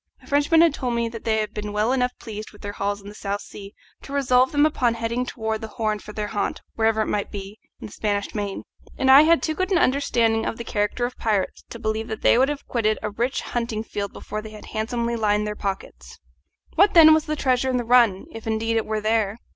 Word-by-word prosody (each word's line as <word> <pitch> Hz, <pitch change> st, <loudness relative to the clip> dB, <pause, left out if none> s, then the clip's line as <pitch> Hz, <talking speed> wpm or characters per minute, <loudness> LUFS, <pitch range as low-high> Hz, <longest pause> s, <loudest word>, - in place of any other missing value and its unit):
The -, -, -20 dB
Frenchman 290 Hz, +3 st, +3 dB
had 335 Hz, -3 st, +5 dB
told 250 Hz, -4 st, -2 dB
me 235 Hz, 0 st, 0 dB
that 230 Hz, -1 st, -9 dB
they 220 Hz, -1 st, +2 dB
had 215 Hz, -1 st, -2 dB
been 210 Hz, 0 st, -5 dB
well 210 Hz, +3 st, +1 dB
enough 250 Hz, -1 st, 0 dB
pleased 215 Hz, -1 st, -8 dB
with 210 Hz, -, -17 dB
their 205 Hz, -, -4 dB
hauls 205 Hz, 0 st, -3 dB
in -, -, -11 dB
the 205 Hz, -, -9 dB
South 200 Hz, -1 st, -4 dB
Sea 200 Hz, 0 st, -11 dB, 0.3 s
to -, -, -11 dB
resolve 260 Hz, -2 st, +3 dB
them 290 Hz, 0 st, +4 dB
upon 250 Hz, -6 st, +1 dB
heading 230 Hz, +2 st, -2 dB
round 220 Hz, -1 st, -2 dB
the 220 Hz, -, -5 dB
Horn 215 Hz, -1 st, -2 dB
for 210 Hz, -, -10 dB
their 210 Hz, 0 st, -4 dB
haunt, 205 Hz, -2 st, -2 dB
wherever 220 Hz, -1 st, +1 dB
it -, -, -5 dB
might 205 Hz, -, -1 dB
be, 200 Hz, +1 st, -8 dB, 0.2 s
in -, -, -8 dB
the 210 Hz, -, -10 dB
Spanish 205 Hz, -1 st, -2 dB
main; 205 Hz, -2 st, -4 dB, 0.3 s
and 265 Hz, -, +4 dB
I 275 Hz, +2 st, +10 dB
had 330 Hz, +2 st, +4 dB
too 315 Hz, -, 0 dB
good 370 Hz, +4 st, -2 dB
an 370 Hz, -, +4 dB
understanding 235 Hz, -6 st, +2 dB
of 225 Hz, -, -3 dB
the 235 Hz, -, -5 dB
character 210 Hz, +2 st, -1 dB
of 245 Hz, -, -6 dB
pirates 210 Hz, -4 st, -1 dB
to -, -, -7 dB
believe 220 Hz, -1 st, -2 dB
that 220 Hz, -, -6 dB
they -, -, +6 dB
would 260 Hz, +3 st, +3 dB
have 295 Hz, -1 st, -5 dB
quitted 215 Hz, -3 st, +1 dB
a 210 Hz, -, -2 dB
rich 240 Hz, +5 st, -1 dB
hunting 230 Hz, -2 st, -3 dB
field 200 Hz, -3 st, -4 dB
before 215 Hz, -, -6 dB
they 220 Hz, -, -9 dB
had 215 Hz, 0 st, -11 dB
handsomely 235 Hz, +2 st, -1 dB
lined 210 Hz, -2 st, +1 dB
their 210 Hz, 0 st, -3 dB
pockets. 125 Hz, -, -6 dB, 0.6 s
What, 395 Hz, +3 st, +4 dB
then, 315 Hz, -2 st, +9 dB
was 315 Hz, -1 st, +2 dB
the 305 Hz, -, -2 dB
treasure 260 Hz, -2 st, +1 dB
in 255 Hz, -, +1 dB
the 245 Hz, -, -1 dB
run, 230 Hz, -5 st, +4 dB
if 225 Hz, 0 st, -9 dB
indeed 225 Hz, +1 st, 0 dB
it 225 Hz, -, -1 dB
were 215 Hz, 0 st, -1 dB
there? 215 Hz, -1 st, +1 dB
225 Hz, 250 wpm, -23 LUFS, 210-250 Hz, 0.6 s, I